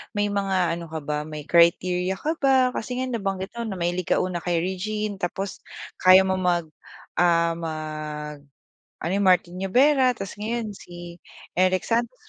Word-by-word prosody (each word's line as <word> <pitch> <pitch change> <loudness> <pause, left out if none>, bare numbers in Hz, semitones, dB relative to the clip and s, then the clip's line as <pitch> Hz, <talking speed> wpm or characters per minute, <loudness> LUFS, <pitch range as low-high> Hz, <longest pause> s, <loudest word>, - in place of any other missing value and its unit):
may 205 0 +1
mga 190 -4 0
ano 170 -1 -7
ka 160 - -3
ba 150 0 -2
may 150 -1 -7
criteria 180 +2 +3
ka 315 +2 -1
ba, 265 -2 +4
kasi 250 +3 -3
nga 260 - -1
nabanggit 195 -4 -3
mo 235 - -3
na 195 - -4
mahilig 175 +1 -1
ka - - +4
una 180 -1 -2
kay 175 -2 +1
Regine 210 +3 -3
tapos 190 +2 -4 0.4
kaya 185 +1 +7
mo 190 - +1
mag, 175 -3 +1 0.5
ah, 170 -1 +4
mag, 155 -2 -5 0.6
ano 170 - -2
Martin 180 -2 +3
Nievera 255 +6 +4
tapos 195 0 -7
ngayon 220 0 -3
si 175 0 -10 0.4
Eric 185 0 +3
Santos. 235 +2 0
185 Hz, 160 wpm, -24 LUFS, 170-210 Hz, 0.6 s, kaya